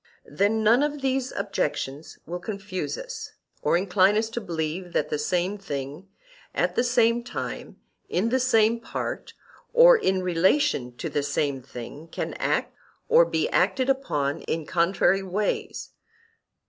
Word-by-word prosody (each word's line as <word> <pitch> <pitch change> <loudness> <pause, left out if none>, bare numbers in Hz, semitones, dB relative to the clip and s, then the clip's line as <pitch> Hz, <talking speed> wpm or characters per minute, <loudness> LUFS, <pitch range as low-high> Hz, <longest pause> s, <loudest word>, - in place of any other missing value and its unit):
Then 215 +2 +1
none 230 +5 +5
of 295 -1 -1
these 265 -1 0
objections 150 -6 -3
will 175 +2 -5
confuse 195 - -4
us, - - -7 0.3
or - - +3
incline 190 +2 +3
us 220 +1 0
to 235 - -3
believe 170 -1 -4
that 150 - 0
the 150 - -1
same 180 +6 -1
thing 145 0 -6 0.5
at - - +1
the 240 - +2
same 240 -1 +3
time, 245 - -6 0.3
in 200 +6 +1
the 260 +2 +2
same 230 -2 +3
part 230 - -5 0.4
or - - +8
in 190 - +1
relation 165 - +1
to - - -4
the 145 - -1
same 140 -1 -1
thing, 130 +4 -9
can - - -4
act - - 0 0.4
or 485 +1 +7
be - - 0
acted 265 0 +2
upon 150 - -1
in 160 -1 -1
contrary 180 +3 +2
ways. 195 +2 -3
195 Hz, 145 wpm, -25 LUFS, 165-240 Hz, 0.5 s, or